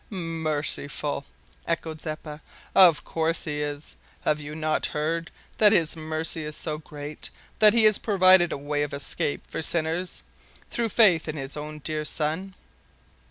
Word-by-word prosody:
"Merciful!" 155 -5 -2 0.4
echoed 160 -2 -3
Zeppa. 155 -1 -7 0.3
"Of 175 -5 +6
course 165 0 -1
He 150 -1 -3
is. 145 0 -5 0.2
Have 150 0 0
you 150 +1 -7
not 155 0 0
heard 165 +3 -1 0.3
that 210 -1 +7
His 165 -5 +3
mercy 160 0 -2
is 150 0 -5
so 155 -2 -4
great 150 -1 -8 0.3
that 210 -1 +7
He 230 - +5
has 215 -1 +5
provided 185 -4 +5
a - - -2
way 145 +1 -2
of 145 -1 -2
escape 140 +1 -2
for - - -4
sinners 165 +2 0 0.5
through 235 -1 -1
faith 195 -8 +4
in 155 - -3
His 135 0 -4
own 150 0 -6
dear 155 -1 -1
Son?" 160 +6 -1
155 Hz, 155 wpm, -25 LUFS, 150-170 Hz, 0.5 s, that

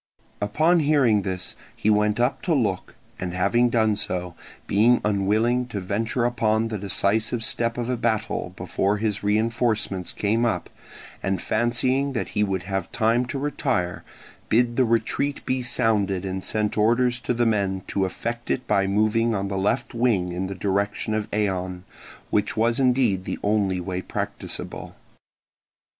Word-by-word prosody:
Upon 155 +12 +3
hearing 140 -9 +3
this 95 -1 -3 0.2
he 110 - +1
went 105 +1 +2
up 120 +2 +1
to 170 - +1
look, 120 -7 -1 0.2
and 90 0 -4
having 120 +7 +3
done 110 -3 +2
so, 90 -3 -3 0.3
being 115 +5 +4
unwilling 110 +5 +1
to 105 -4 -4
venture 110 +5 -1
upon 115 -2 +1
the 110 -2 -3
decisive 110 +4 0
step 115 +1 0
of 120 -1 -2
a 125 - 0
battle 110 -5 -1
before 95 +3 0
his 105 -1 -1
reinforcements 110 -2 0
came 110 +3 0
up, 120 - -1 0.5
and 95 -1 -1
fancying 125 +6 0
that 115 - -2
he 105 - 0
would 95 -3 -1
have 95 -1 -3
time 120 +1 +2
to 135 - -3
retire, 135 -10 -1 0.5
bid 120 +1 +3
the 130 - +3
retreat 120 +5 0
be 130 0 0
sounded 105 -6 +1
and 95 0 -3
sent 105 0 -1
orders 120 +3 +3
to 125 - -3
the 120 0 +2
men 100 -4 0
to 100 - 0
effect 115 +5 -4
it 130 - -1
by 100 -2 +2
moving 110 +3 +2
on 100 0 -2
the 100 - -3
left 105 +7 0
wing 115 -7 +1
in 90 +2 -2
the 100 - -5
direction 100 +3 -1
of 110 -1 -2
Eion, 95 -3 -1 0.5
which 105 +1 0
was 115 +2 +2
indeed 125 -8 +2
the - - -3
only 100 -3 +1
way 90 +1 -3
practicable. - - -5
110 Hz, 160 wpm, -24 LUFS, 100-120 Hz, 0.5 s, being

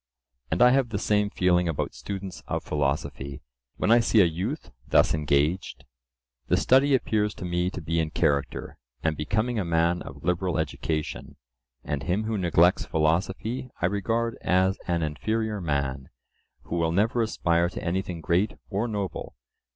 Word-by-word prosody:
And 125 - +3
I 125 - +7
have 130 -2 +2
the 100 - -2
same 105 0 +1
feeling 90 -3 +2
about 80 - -2
students 95 -2 -6
of - - -2
philosophy; 70 -1 -2 0.3
when - - +1
I 120 - +7
see 115 -1 +3
a - - +6
youth 95 - -3 0.2
thus - - +4
engaged,—the 65 -5 -2
study 135 +2 +4
appears 105 -4 0
to - - -7
me 90 +1 0
to 95 - -6
be 80 +1 -1
in 80 -1 0
character, 70 -4 -1 0.2
and 80 -1 +1
becoming 110 +10 -1
a - - 0
man 85 +1 +1
of 70 +1 -10
liberal 90 0 0
education, 80 0 -3 0.5
and 70 -1 -3
him 90 +9 0
who 110 0 -2
neglects 85 0 +4
philosophy 95 +10 -1
I - - +1
regard 115 +5 0
as 95 +1 +2
an 85 -2 0
inferior 105 +8 -2
man, 70 -4 -2 0.5
who 85 - -4
will 80 -1 +1
never 110 +7 +2
aspire 85 -6 +1
to - - -7
anything 90 -1 -2
great 90 +5 +1 0.2
or 105 +4 0
noble. 100 -5 -4
90 Hz, 160 wpm, -26 LUFS, 80-105 Hz, 0.5 s, I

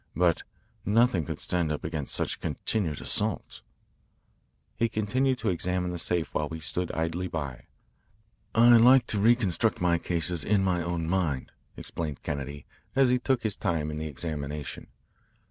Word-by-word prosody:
But 85 0 +3 0.4
nothing 105 -5 +3
could - - -4
stand 85 -3 -1
up 75 - -3
against 80 -4 -2
such - - -1
continued 85 -10 -2
assaults." 105 -2 -1 1.1
He 115 - +1
continued 130 +6 +1
to 115 - -1
examine 90 0 -1
the 90 - -4
safe 85 -1 -1
while 75 -1 -1
we 80 - -6
stood 90 +3 -2
idly 80 +3 -1
by. 70 -8 -5 0.9
"I 120 +1 +8
like 125 +2 +7
to 105 - 0
reconstruct 110 -1 +2
my 85 -1 +2
cases 85 -2 -1
in 100 +2 +2
my 90 -2 +1
own 85 -1 -2
mind," 80 -7 -1 0.3
explained 75 -5 -5
Kennedy, 70 0 -4 0.3
as 135 -2 +5
he 125 - +3
took 125 -2 0
his 110 -2 -1
time 80 -6 -1
in 75 - -5
the 80 - -3
examination. 75 0 -5
90 Hz, 155 wpm, -28 LUFS, 80-110 Hz, 1.1 s, I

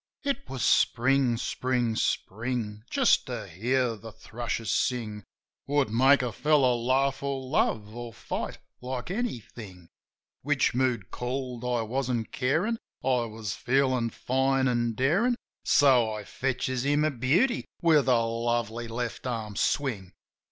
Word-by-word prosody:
It 280 -1 -2
was 130 -2 -3
Spring, 125 0 +3
Spring, 125 -1 -1
Spring! 110 -1 -2
Just 270 -3 +3
to 120 -5 -5
hear 120 +7 0
the 110 +1 -10
thrushes 115 +1 -4
sing 110 -5 -1 0.4
Would 140 -5 +1
make 130 +4 +5
a 125 - -1
fellozv 130 -4 +2
laugh, 135 +2 +1
or 140 -1 -2
love, 110 -5 0
or 120 -1 -6
fight - - -5 0.2
like 125 +4 -4
anything. 115 - -5 0.5
Which 145 -1 +1
mood 125 -6 0
called 125 -1 -4
I 120 -2 0
wasn't 120 -1 -2
carin'; 175 - 0 0.2
I 125 -2 +2
was 110 -4 -5
feelin' 130 -2 +1
fine 130 +3 +1
an' 120 -2 0
darin'; 175 - +2 0.3
So 125 -6 +4
I 105 -1 -5
fetches 130 +2 -2
him 145 +2 +2
a 155 - +2
beauty 145 - +1
with 155 -6 +4
a 125 -3 +4
lovely 115 0 -1
left 120 +2 -4
arm 110 -4 -4
swing. 100 -8 -1
125 Hz, 135 wpm, -28 LUFS, 115-135 Hz, 0.5 s, make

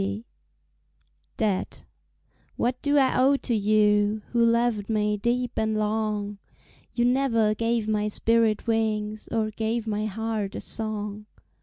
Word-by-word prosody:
Debt 205 -4 -2 0.7
What 250 +1 -1
do 285 0 +2
I 265 -2 +3
owe 275 +2 +4
to 250 - -3
you 210 0 +2
Who 235 -1 +3
loved 230 -3 +1
me 210 -1 +1
deep 240 +3 -1
and 220 0 0
long? 210 -1 -1 0.6
You 240 - +2
never 245 -4 +2
gave 230 0 -1
my 210 -1 0
spirit 225 0 +1
wings 215 -2 -1
Or 220 -1 -1
gave 225 +1 -2
my 215 -1 -1
heart 215 -1 -3
a - - -3
song. 210 -1 -4
220 Hz, 130 wpm, -26 LUFS, 210-230 Hz, 0.7 s, owe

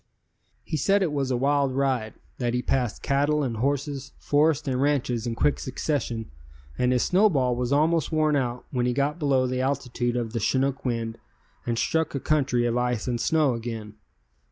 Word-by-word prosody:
He 155 - -3
said 195 +7 +3
it 170 - 0
was 140 -3 -1
a 125 - +1
wild 140 0 +1
ride, 130 -5 0 0.2
that 120 -1 0
he 125 - -1
passed 125 -5 -1
cattle 145 +2 +1
and 120 -4 -2
horses, 140 +2 -2
forests 150 0 +2
and 130 -1 0
ranches 125 -5 0
in 115 - -2
quick 145 - +1
succession 125 - -3 0.4
and 125 0 +1
his 125 -1 +2
snowball 160 - +3
was 125 +1 -2
almost 155 +2 +2
worn 155 -1 +2
out 125 -3 -2
when 125 -2 0
he 125 - +1
got 140 +5 0
below 135 -4 +2
the 130 0 -1
altitude 125 -3 -1
of 115 -2 -3
the 115 - -1
chinook 135 +4 0
wind 115 -2 -2 0.5
and 120 -1 0
struck 160 +4 0
a - - 0
country 135 -5 +1
of 120 0 0
ice 125 -2 -1
and 120 -2 -1
snow 155 -5 +2
again. 115 -2 -5
130 Hz, 185 wpm, -25 LUFS, 120-145 Hz, 0.5 s, said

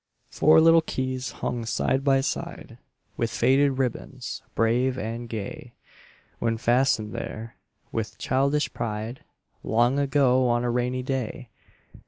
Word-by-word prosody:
Four 155 +1 +5
little 165 0 +6
keys 130 -4 -3
hung 120 -1 -3
side 130 +4 0
by 135 -1 +3
side, 135 - -5 0.4
With 115 - 0
faded 135 +5 +3
ribbons, 130 0 -3
brave 125 +3 +2
and 115 +1 -5
gay 110 -3 -6 0.7
When 115 -1 0
fastened 120 -2 +2
there, 110 +1 -6 0.3
with 110 -1 -4
childish 140 +3 0
pride, 110 +3 -4 0.4
Long 120 +5 +2
ago, 135 -2 +3
on 120 0 +1
a 120 - 0
rainy 125 +1 -1
day. 130 -2 -3
125 Hz, 125 wpm, -25 LUFS, 115-135 Hz, 0.7 s, little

